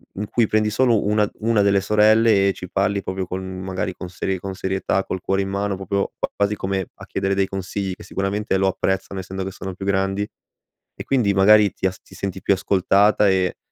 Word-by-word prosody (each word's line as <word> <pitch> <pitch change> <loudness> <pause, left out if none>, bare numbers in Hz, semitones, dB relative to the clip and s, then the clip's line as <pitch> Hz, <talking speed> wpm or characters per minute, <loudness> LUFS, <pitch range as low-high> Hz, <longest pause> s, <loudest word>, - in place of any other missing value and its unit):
in 105 +2 -4
cui 115 0 +1
prendi 110 0 +2
solo 115 -2 +2
una 105 0 +3 0.2
una 115 -2 +3
delle 100 0 +3
sorelle, 105 0 +4
e - - 0
ci 90 - -9
parli 100 +1 0
proprio 95 0 -3
con 95 +1 -4 0.2
magari, 95 0 -3
con 90 - -7
serie 95 +1 -2
con 95 +1 -6
serietà, 95 +1 -1
col 95 - -4
cuore 95 +1 0
in - - -4
mano, 100 0 -2
proprio 100 +1 -1
q - - +1
quasi 100 +1 +1
come 95 -1 -2
a - - -12
chiedere 95 0 -1
dei 95 0 +1
consigli, 95 0 -4
che - - -12
sicuramente 100 +1 -1
lo 95 0 +2
apprezzano, 95 +1 -1
essendo 95 +1 -5
che 95 - -4
sono 95 0 -7
più 95 - -7
grandi, 95 +1 0 0.7
e - - -7
quindi 120 -7 +2
magari 100 +1 +6
ti - - -5
as 95 - -6
ti - - -19
senti 95 0 -5
più - - +3
ascoltata, 100 +2 +3
e 95 -1 +1
95 Hz, 215 wpm, -22 LUFS, 95-105 Hz, 0.7 s, magari